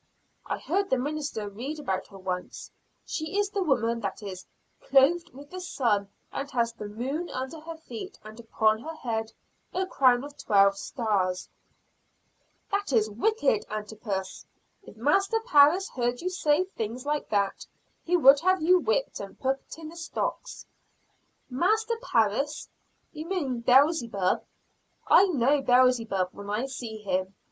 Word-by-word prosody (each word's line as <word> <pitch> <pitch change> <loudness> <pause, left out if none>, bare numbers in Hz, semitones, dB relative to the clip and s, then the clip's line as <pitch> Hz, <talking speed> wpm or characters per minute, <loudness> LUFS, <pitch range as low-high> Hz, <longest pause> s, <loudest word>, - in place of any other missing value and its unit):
I - - -2
heard 395 0 -1
the 260 - +3
minister 285 -5 -3
read 245 +10 -6
about 195 -11 -3
her 195 - -13
once, 185 -1 -5 0.3
she 315 +4 -3
is 410 -1 +1
the 405 -2 -1
woman 235 -8 +1
that 205 0 -5
is 185 -2 -7 0.3
'clothed 320 +6 +3
with 285 0 -13
the 370 0 -6
sun 215 - 0 0.2
and 280 - -4
has 235 -3 0
the 210 -2 -7
moon 265 +11 -4
under 260 +5 -5
her 325 +1 -8
feet, 245 -8 -8
and 215 +2 -11
upon 220 -1 +1
her 320 +4 -7
head 225 -6 -3 0.4
a 375 +1 +1
crown 255 -8 +3
of 285 0 -9
twelve 200 -1 +4
stars.'" 195 -5 -1 1.2
"That 400 -4 -1
is 215 -4 +2
wicked, 435 - +1
Antipas. 210 -2 -5 0.4
If 305 - -15
Master 390 - +2
Parris 345 -1 +5
heard 245 -1 0
that 245 - -12
you 365 - -1
said 365 +2 +1
things 230 +4 -4
like 295 0 -2
that, 200 -2 0 0.4
he 355 +1 +2
would 280 -3 +7
have 370 +3 +2
you 360 +3 +5
whipped - - -1
and 195 -1 -9
put 270 +3 -2
in 320 -1 -8
the 335 - -12
stocks." 335 - -4 0.8
"Master 430 - +1
Parris? 275 - 0 0.4
you 310 +1 -7
mean 290 -10 -2
Beelzebub! 240 - +3 0.6
I 395 - +6
know 285 -3 +2
Beelzebub 245 -7 +3
when 200 0 -9
I 215 +5 -1
see 245 -5 -6
him." 190 -1 -2
260 Hz, 155 wpm, -27 LUFS, 215-330 Hz, 1.2 s, would